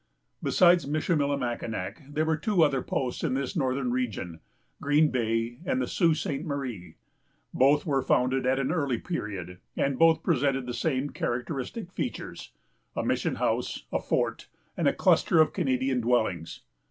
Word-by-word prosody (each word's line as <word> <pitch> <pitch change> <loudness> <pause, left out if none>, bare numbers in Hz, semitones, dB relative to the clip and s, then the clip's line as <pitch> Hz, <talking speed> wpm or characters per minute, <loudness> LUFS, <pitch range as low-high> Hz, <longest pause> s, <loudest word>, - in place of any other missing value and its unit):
Besides 175 -4 +4
Michillimackinac, 140 - -1
there 155 +2 0
were 160 0 +2
two 175 +2 +2
other 140 -4 +2
posts 125 0 -3
in 140 -6 0
this 135 -1 -2
northern 130 -4 0
region, 105 -9 -3 0.4
Green 150 +2 +3
Bay, 115 0 -1
and 260 +6 0
the - - 0
Sault 165 -4 +2
Ste. 150 -4 -3
Marie. 135 - -5 0.6
Both 140 +3 +4
were 140 -4 +1
founded 130 +1 +1
at 130 +1 +3
an 135 +1 0
early 140 -7 0
period, 100 - -5 0.2
and 135 -2 0
both 165 -1 +5
presented 135 -1 +1
the 125 - -4
same 135 +1 -1
characteristic 135 - -3
features——a - - -7
mission - - 0
house, - - -1
a - - +2
fort, - - -1 0.3
and - - +1
a - - +4
cluster 170 - +3
of 155 -1 +4
Canadian 130 -6 0
dwellings. 110 -9 0
135 Hz, 150 wpm, -28 LUFS, 125-155 Hz, 0.6 s, both